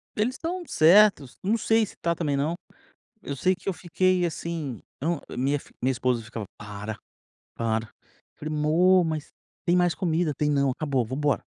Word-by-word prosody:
Eles 235 +5 0
estão 350 +4 -4
certos, 165 - +5
não 215 +4 +2
sei 225 0 +3
se - - -12
está 170 0 -1
também 150 -4 -1
não. 150 +5 0 0.7
Eu 140 -5 -5
sei 185 +7 +2
que 185 - -8
eu 195 - +2
fiquei 180 +1 +1
assim 160 -6 -4 0.2
eu 160 +2 0
não, - - -8
minha 140 +3 +1
fi - - -17
minha 130 +2 +2
esposa 125 -2 0
ficava: 115 -1 -6
"Para, 105 +1 -6 0.6
para". 115 -1 0
Eu - - -32
falei: 155 +1 -4
"Mô, 175 +5 +4
mas 155 -2 -3 0.4
tem 175 - +4
mais 175 -1 +3
comida". 165 -3 0
"Tem 150 +2 0
não, 140 -2 +2
acabou, 135 -2 0
vamos 130 +5 -5
embora". 150 -1 +1
155 Hz, 185 wpm, -26 LUFS, 130-180 Hz, 0.7 s, certos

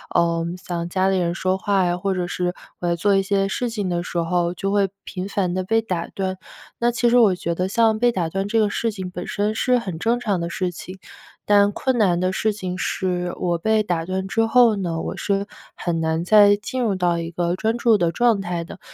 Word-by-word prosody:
嗯， 170 0 +1
像 175 -2 -4
家 190 +1 +1
里 190 - +1
人 170 -1 -1
说 185 +1 0
话， 190 -3 +1
或 195 +2 -1
者 180 -1 -1
是 180 0 -2 0.2
我 175 - -2
在 170 - +1
做 200 +4 +2
一 195 - +3
些 195 0 +1
事 245 +5 -2
情 205 -5 -3
的 175 -1 -1
时 175 - -5
候， 170 +1 0
就 195 +2 -3
会 200 -2 +2
频 185 0 -5
繁 195 -3 -1
地 185 0 -1
被 225 +4 +1
打 180 -6 -3
断。 190 -1 -3 0.4
那 235 - +2
其 240 0 +1
实 245 - +4
我 215 -6 +5
觉 170 -1 -3
得 180 +2 -1
像 220 +2 +2
被 240 +1 +3
打 175 -5 -1
断 195 +3 -2
这 225 +2 +1
个 210 -1 +3
事 230 +2 -1
情 190 -3 -6
本 180 0 -6
身 210 +1 -1
是 250 +3 +2
很 185 -9 -5
正 235 +5 +1
常 205 -6 -1
的 170 0 -3
事 180 +1 -2
情， 185 +2 -9 0.5
但 205 0 +4
困 255 +4 -1
难 180 -5 +3
的 185 0 +1
事 215 +3 0
情 185 -3 -5
是 180 -2 -2
我 175 -1 0
被 220 +4 +1
打 170 -4 -2
断 190 +1 -3
之 225 +3 +1
后 235 -2 +5
呢， 170 -4 -2
我 - - -4
是 200 0 -1 0.3
很 170 -2 -2
难 160 +1 0
再 205 +1 +6
进 250 +5 -4
入 220 -5 +1
到 175 -2 +1
一 165 0 -4
个 175 +1 -1
专 220 +4 -1
注 230 -3 +4
的 170 -2 +1
状 235 0 +2
态 175 -2 -3
的， 170 - -11
190 Hz, 255 characters per minute, -22 LUFS, 175-210 Hz, 0.5 s, 再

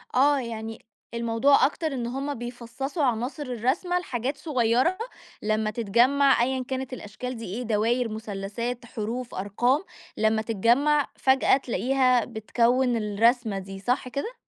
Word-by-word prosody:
آه 280 +2 +4
يعني 225 -2 -6 0.3
الموضوع 235 +4 +3
أكتر 315 +2 -1
إن 240 -2 -3
هم 275 +3 -3
بيفصصوا 245 +5 -5
عناصر 250 +4 -1
الرسمة 265 - 0
لحاجات 265 -3 -3
صغيرة، 260 +4 +1 0.4
لما 215 0 0
تتجمع 240 +6 +3
أيًا 260 0 -1
كانت 260 -1 -4
الأشكال 250 +2 -6
دي 225 - -7
إيه 220 +7 -4
دواير، 230 +2 +1
مثلثات، 220 +3 -5
حروف، 235 +3 -5
أرقام، 240 - +1 0.3
لما 220 0 +2
تتجمع، 240 +7 +2
فجأة 265 0 +4
تلاقيها 255 -1 +2
بتكوّن 240 +3 +1
الرسمة 220 0 +1
دي 195 0 -8
صح 250 +5 -1
كده؟ 280 - -4
245 Hz, 130 wpm, -26 LUFS, 225-265 Hz, 0.4 s, آه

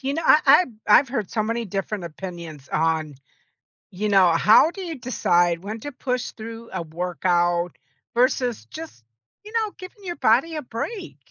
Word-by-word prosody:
you 275 +1 -2
know, 330 - -2
I 305 - +6
I've 270 -1 +6
I've 260 +6 +6
heard 230 -7 -3
so 220 - 0
many 230 +2 -2
different 195 -1 -4
opinions 170 -4 -8
on, 155 -1 0 0.8
you 210 +3 -2
know, 190 -3 +5
how 215 - +5
do 390 - -8
you 340 -3 -5
decide 175 - +1
when 215 +2 -5
to 290 - -6
push 250 -1 -3
through 230 +1 -9
a 185 - -2
workout, 175 +1 0 0.4
versus 245 -1 +1
just, 315 - -10 0.4
you 425 - -11
know, 440 -2 0
giving 390 +2 -12
your 350 -2 -4
body 270 +6 +2
a 305 - -3
break? 340 - -6
220 Hz, 170 wpm, -23 LUFS, 175-275 Hz, 0.8 s, I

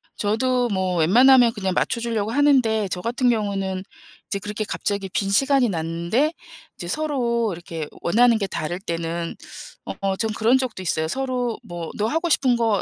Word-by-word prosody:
저도 245 +4 +1
뭐 190 -3 -1
웬만하면 240 +8 +6
그냥 190 -3 -2
맞춰주려고 230 -2 -1
하는데 250 -7 +3
저 180 - -3
같은 245 +4 +1
경우는 195 -4 -1 0.4
이제 200 - -3
그렇게 210 +2 -4
갑자기 200 -2 -2
빈 195 +2 -1
시간이 270 +4 +3
났는데 170 - -1 0.4
이제 175 - -7
서로 240 - 0
이렇게 165 -2 -6
원하는 230 +5 +4
게 200 - -1
다를 175 0 -4
때는 170 -2 -4 0.7
어 195 -1 0
전 220 0 -1
그런 230 +4 +3
적도 250 -7 -3
있어요. 160 -3 0
서로 250 +2 -2
뭐 170 -2 -7
"너 210 - 0
하고 325 +7 -1
싶은 260 -5 +3
거 225 -4 +1
215 Hz, 335 characters per minute, -22 LUFS, 185-245 Hz, 0.7 s, 웬만하면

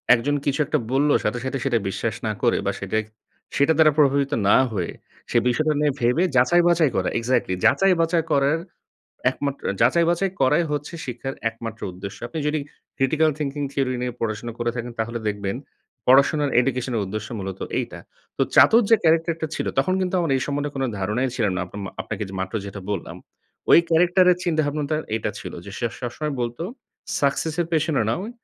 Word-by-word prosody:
একজন 145 +5 -1
কিছু 140 +1 0
একটা 150 +1 0
বলল 145 +2 +3
সাথে, 115 +3 -1
সাথে 130 +1 -2
সেটা 125 -4 +2
বিশ্বাস 110 +3 -2
না - - 0
করে - - +3
বা - - +1
সেটাই 110 0 -1 0.5
সেটা 140 +3 +4
দ্বারা 155 -1 +6
প্রভাবিত 140 -1 +3 0.2
না - - +7
হয়ে 90 -6 -2 0.4
সে - - +3
বিষয়টা 155 +5 +2
নিয়ে 150 -1 +2
ভেবে 125 +9 +3 0.5
যাচাই-বাচাই 165 -5 +3
করা। 95 - +1
এক্সাক্টলি 115 -5 0 0.5
যাচাই-বাচাই 165 0 +2
করার 140 +3 +2 0.7
একমাত্র 140 +1 -4 0.2
যাচাই-বাছাই 170 +8 +3
করাই 150 +6 +3
হচ্ছে 145 +3 -3
শিক্ষার 130 +2 -5 0.2
একমাত্র 115 0 -8
উদ্দেশ্য। 95 +2 -8
আপনি 160 - -6
যদি 155 0 0 0.4
critical 155 +4 +2
thinking 145 -1 -2
theory 135 -2 0
নিয়ে 125 0 -2
পড়াশোনা 115 +1 -3
করে 120 0 0
থাকেন 120 0 -4
তাহলে 115 +1 -2
দেখবেন, 100 +1 -3 0.5
পড়াশোনার 140 +3 +4
education 125 0 -1
এর - - +1
উদ্দেশ্য 105 +2 -5
মূলত 95 -1 -6 0.2
এইটা। - - -4 0.4
তো - - +1
চাতুর 230 +2 +7
যে 225 - +8
character 165 +1 +3
টা 160 - -1
ছিল - - -3
তখন 165 +8 +2
কিন্তু 185 0 -1
আমার 165 -4 -1
এই - - -1
সম্বন্ধে 145 0 -2
কোনো 135 0 0
ধারণাই 105 +7 0
ছিল 115 - +1
না। - - -1
আপনা 100 - -10
মা - - -5
আপনাকে - - -5
যে 95 - -9
মাত্র 95 +2 -4
যেটা 100 0 -7
বললাম। 100 - -4 0.5
ওই - - +9
character 175 +3 +4
এর - - -1
চিন্তাভাবনাটা 155 -2 0 0.2
এটা 110 - -2
ছিল - - -7
যে 100 - -9
সে 120 - 0
সবসময় 130 +5 -3
বলত 120 0 -3 0.6
"success 145 +3 0
এর 170 - 0
পেছনে 155 -2 +1
নয় 190 - -3
135 Hz, 180 wpm, -23 LUFS, 115-155 Hz, 0.7 s, ওই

